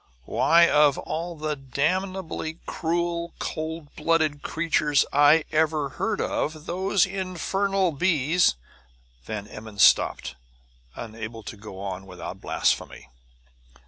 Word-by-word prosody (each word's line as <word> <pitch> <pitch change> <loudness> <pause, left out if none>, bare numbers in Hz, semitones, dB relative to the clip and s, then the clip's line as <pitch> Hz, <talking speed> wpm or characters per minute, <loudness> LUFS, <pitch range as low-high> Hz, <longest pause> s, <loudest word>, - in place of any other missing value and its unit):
"Why, 170 - +5
of 150 -3 +4
all 170 +2 -4
the 155 -1 -2
damnably 160 +4 -2
cruel, 170 +1 -2
cold 160 -1 -5
blooded 155 -2 +1
creatures 150 -3 +1
I 145 +2 +5
ever 155 -2 +1
heard 210 +9 -2
of, 155 0 -2
those 190 +2 +2
infernal 195 0 -1
bees 160 - +2 0.3
" - - -34
Van 105 -2 -4
Emmon 105 -1 -10
stopped, 65 -8 +4 0.6
unable 110 0 -7
to 110 - -7
go 100 -2 -10
on 95 -1 -5
without 90 -2 -8
blasphemy. - - -1
155 Hz, 110 wpm, -25 LUFS, 115-170 Hz, 0.6 s, Why